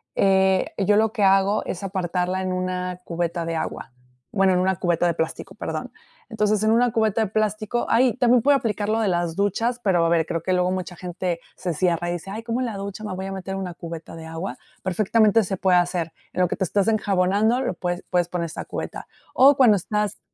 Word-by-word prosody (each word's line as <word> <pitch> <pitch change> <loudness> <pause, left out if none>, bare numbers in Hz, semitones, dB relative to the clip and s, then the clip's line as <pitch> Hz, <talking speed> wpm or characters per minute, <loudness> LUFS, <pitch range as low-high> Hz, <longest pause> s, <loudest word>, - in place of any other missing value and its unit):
Eh, 190 -1 +3
yo 205 +1 +3
lo 220 0 +2
que 215 -4 0
hago, 195 +2 +3
es 185 - -4
apartarla 185 -1 -1
en 185 - -2
una 185 0 -3
cubeta 170 0 -2
de 165 0 -2
agua. 125 -6 -4 0.4
Bueno, 195 -2 +3
en 180 - +2
una 190 +1 +2
cubeta 175 0 +1
de 170 - +1
plástico. 160 0 -4
Perdón. - - -5 0.4
Entonces, 210 -1 +1
en 215 - +3
una 240 +1 +3
cubeta 220 -1 +1
de - - -1
plástico 215 +2 -1
ah, 230 - +4
y 255 -3 +3
también 245 -1 +4
puede 285 0 +5
aplicar 215 -5 -2
lo 220 +1 +1
de 220 - +1
las 175 -2 0
duchas. 230 +5 0
Pero 175 -4 +3
a - - +2
ver, 165 -1 +2
creo 165 0 -3
que 185 - -1
luego, 180 0 +2
mucha 185 -1 -4
gente 180 -1 -3 0.2
se 175 -2 -3
cierra, 175 +1 0
y - - -1
dice: 175 +3 -6
"Ay. 220 +2 -6
¿Cómo 235 +1 -2
en 255 - 0
la 220 - -5
ducha, 200 +2 -6
me 205 -3 -4
voy 190 +1 -5
a 195 - -5
meter 190 0 -5
una 185 -2 -4
cubeta 165 -1 -8
de 165 -1 -9
agua?". 165 +4 -5 0.3
Perfectamente, 215 +3 +3
se 190 +1 -3
puede 185 0 +3
hacer. 175 -2 0 0.2
En 185 - 0
lo 180 - +4
que - - -2
te - - 0
estás 200 +4 0
enjabonando, 210 +3 +2
lo 255 - -1
pues 175 -1 -3
puedes 175 -2 +1
poner 175 -1 -2
esta 160 - -6
cubeta. - - -6 0.3
O 275 +2 +6
cuando 235 -6 +6
estás, 210 +3 -2
190 Hz, 230 wpm, -23 LUFS, 175-215 Hz, 0.4 s, O